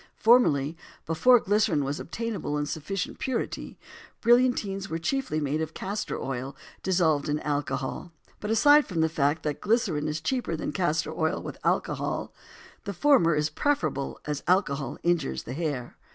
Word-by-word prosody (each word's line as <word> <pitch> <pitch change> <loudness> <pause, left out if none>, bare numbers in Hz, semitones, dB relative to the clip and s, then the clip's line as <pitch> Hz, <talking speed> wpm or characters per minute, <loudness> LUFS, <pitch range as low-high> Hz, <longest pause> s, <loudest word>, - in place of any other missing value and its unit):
Formerly, 165 - +4 0.3
before 245 +10 +5
glycerin 205 -8 +2
was 140 +3 -3
obtainable 205 -8 -3
in 145 - -1
sufficient 160 +6 -4
purity, 260 -3 -3 0.4
brillantines 235 -5 +2
were 165 - -2
chiefly 175 - -1
made 150 +1 -1
of 160 0 -4
castor 205 +3 -3
oil 135 +1 -4 0.3
dissolved 160 -6 +1
in 150 +1 0
alcohol, 145 +2 -3 0.3
but 210 - -5
aside 290 +7 +6
from 170 -4 -1
the 160 - +3
fact 150 0 0
that 150 -1 -3
glycerin 200 -9 +1
is 155 0 -2
cheaper 240 0 -1
than 155 - -3
castor 160 -4 0
oil 160 0 0
with - - -8
alcohol, - - -1 0.5
the 200 - -3
former 175 - +4
is 150 +1 0
preferable, 155 - -1
as 150 -1 -3
alcohol 140 -8 +1
injures 170 - 0
the 125 - -6
hair. 140 -5 -3
160 Hz, 150 wpm, -27 LUFS, 145-205 Hz, 0.5 s, aside